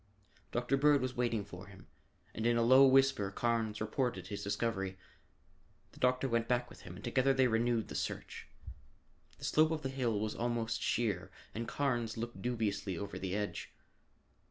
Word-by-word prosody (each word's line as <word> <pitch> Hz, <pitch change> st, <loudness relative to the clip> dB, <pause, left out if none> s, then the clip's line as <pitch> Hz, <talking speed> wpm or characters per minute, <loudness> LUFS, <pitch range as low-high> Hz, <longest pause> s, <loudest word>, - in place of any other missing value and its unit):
Dr. 125 Hz, +3 st, +1 dB
Bird 145 Hz, +1 st, +5 dB
was 130 Hz, -1 st, -3 dB
waiting 115 Hz, -4 st, 0 dB
for 95 Hz, 0 st, -10 dB
him, 95 Hz, -1 st, -14 dB, 0.5 s
and 110 Hz, +1 st, -1 dB
in 120 Hz, 0 st, +3 dB
a 115 Hz, -, +3 dB
low 130 Hz, +3 st, +8 dB
whisper 135 Hz, -6 st, +4 dB
Carnes 110 Hz, 0 st, -1 dB
reported 120 Hz, +3 st, -1 dB
his 100 Hz, -, -5 dB
discovery. 100 Hz, -2 st, -2 dB, 0.9 s
The -, -, -17 dB
doctor 125 Hz, +1 st, +2 dB
went 115 Hz, -2 st, 0 dB
back 120 Hz, 0 st, 0 dB
with -, -, -13 dB
him 90 Hz, -, -9 dB
and -, -, -11 dB
together 130 Hz, +2 st, +2 dB
they 130 Hz, -1 st, +4 dB
renewed 115 Hz, -1 st, +1 dB
the -, -, -8 dB
search. -, -, -4 dB, 0.9 s
The -, -, -7 dB
slope 155 Hz, 0 st, +4 dB
of 160 Hz, -2 st, -2 dB
the 135 Hz, -, -1 dB
hill 125 Hz, -5 st, 0 dB
was 110 Hz, 0 st, -2 dB
almost 115 Hz, -1 st, -1 dB
sheer 105 Hz, -6 st, 0 dB, 0.2 s
and 115 Hz, +1 st, -4 dB
Carnes 120 Hz, -6 st, -1 dB
looked 120 Hz, +1 st, -5 dB
dubiously 105 Hz, -6 st, -1 dB
over 100 Hz, -, -5 dB
the 95 Hz, 0 st, -3 dB
edge. 105 Hz, 0 st, -4 dB
115 Hz, 175 wpm, -34 LUFS, 105-125 Hz, 0.9 s, low